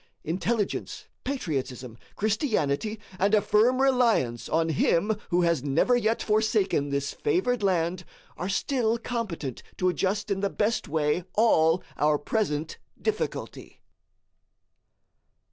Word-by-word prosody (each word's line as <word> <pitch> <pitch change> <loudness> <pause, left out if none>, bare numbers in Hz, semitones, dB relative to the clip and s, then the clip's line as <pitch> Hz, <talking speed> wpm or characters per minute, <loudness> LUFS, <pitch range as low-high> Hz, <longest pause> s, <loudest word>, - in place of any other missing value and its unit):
Intelligence, 195 +6 -2 0.2
patriotism, 135 - -3 0.2
Christianity, 215 - 0 0.2
and 200 +3 +4
a - - +5
firm 235 +6 +3
reliance 235 - +2
on 165 +1 +1
him 170 +7 +2
who 175 0 +2
has 170 -5 +1
never 150 - +2
yet 225 -1 +1
forsaken 210 -8 +1
this 140 0 -2
favored 360 - 0
land, 180 -2 0 0.3
are 180 - -4
still 235 +2 0
competent 215 - -4 0.2
to 185 - +2
adjust 200 +3 -1
in 195 - 0
the 200 0 0
best 215 +3 -1
way 150 +2 0
all 175 -6 +4
our 150 0 +3
present 155 -2 -2 0.2
difficulty. 435 -1 -4
195 Hz, 115 wpm, -27 LUFS, 160-225 Hz, 0.3 s, a